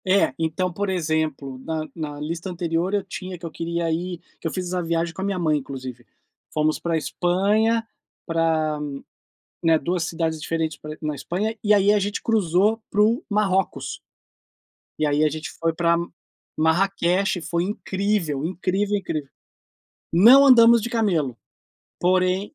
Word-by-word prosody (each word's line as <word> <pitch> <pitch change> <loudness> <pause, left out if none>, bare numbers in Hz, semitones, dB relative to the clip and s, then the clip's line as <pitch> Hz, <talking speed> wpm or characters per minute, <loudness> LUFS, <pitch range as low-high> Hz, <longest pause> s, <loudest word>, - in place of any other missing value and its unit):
É. 190 -7 +3
Então, 165 +3 -1
por 200 +2 -2
exemplo, 155 -6 -2
na 160 -1 -3
na 150 -3 -5
lista 165 +5 -4
anterior, 175 +1 -1
eu 205 -1 +1
tinha 185 -1 -7
que 170 - -10
eu 165 - -5
queria 170 0 -2
ir 175 +1 -3 0.2
que - - -3
eu - - -3
fiz 185 -1 -3
essa 180 0 -1
viagem 165 0 -1
com 190 - -7
a - - -1
minha 200 -2 -1
mãe, 155 -4 +2
inclusive. 130 -3 -8 0.5
Fomos 155 0 +1
para 170 - -2
a - - +3
Espanha, 200 +9 +1 0.4
pra, 160 -2 0 0.8
né, 165 -1 +4
2 175 +4 -1
cidades 160 -1 -2
diferentes 160 0 -2
pra 155 0 -8
na 150 -1 -2
Espanha, 205 +10 -3
e 210 -1 +4
aí 205 0 +5
a 210 - +3
gente 205 +1 -2
cruzou 210 +1 +2
para 210 - +2
o 230 +7 +3
Marrocos. 195 -3 0 1.0
E 155 - +2
aí 145 +1 +2
a 155 - +4
gente 155 +1 -6
foi 165 0 +1
pra 170 0 +2
M 170 0 -3 0.5
Marraquexe, 180 +3 +1
foi 170 +1 -1
incrível, 190 -6 -1
incrível, 190 +4 -1
incrível. 155 -7 -4 0.8
Não 240 +11 +8
andamos 235 -3 +7
de 235 - -4
camelo, 175 - 0 0.6
porém 185 - +1
175 Hz, 160 wpm, -23 LUFS, 160-195 Hz, 1.0 s, Não